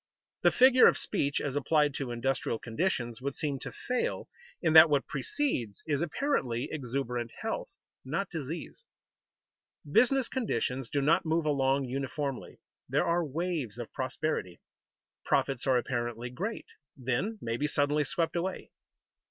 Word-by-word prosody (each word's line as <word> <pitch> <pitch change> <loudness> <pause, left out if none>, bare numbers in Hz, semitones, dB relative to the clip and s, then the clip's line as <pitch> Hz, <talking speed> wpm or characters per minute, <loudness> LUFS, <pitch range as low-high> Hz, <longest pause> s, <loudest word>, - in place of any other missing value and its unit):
The - - +6
figure 255 0 +7
of - - +4
speech 145 -8 0
as 140 -1 -3
applied 145 0 +2
to 135 -3 -4
industrial 120 0 -1
conditions 120 -2 -2
would 140 +1 -3
seem 145 -3 -2
to - - -6
fail, 250 0 -2 0.3
in 160 -3 +1
that 160 0 +10
what 145 -2 +2
precedes 130 - -2
is 145 -1 0
apparently 155 - -1
exuberant 125 -4 -3
health, - - -3 0.3
not 170 +9 -2
disease. 165 - -6 1.0
Business 250 - +4
conditions 130 - -2
do 140 - 0
not 155 +4 +3
move 160 0 0
along 135 -2 +2
uniformly. 135 +1 -4 0.3
There - - +2
are 170 +1 +2
waves 155 - -3
of 120 -2 -7
prosperity. 130 - -2 0.6
Profits 135 -2 0
are 130 -1 +4
apparently 120 -1 -3
great, 200 - -4 0.3
then 130 - -1
may 115 -6 -2
be 145 +5 0
suddenly 150 0 +2
swept 165 +4 -1
away. 180 +2 -3
140 Hz, 140 wpm, -30 LUFS, 125-165 Hz, 1.0 s, that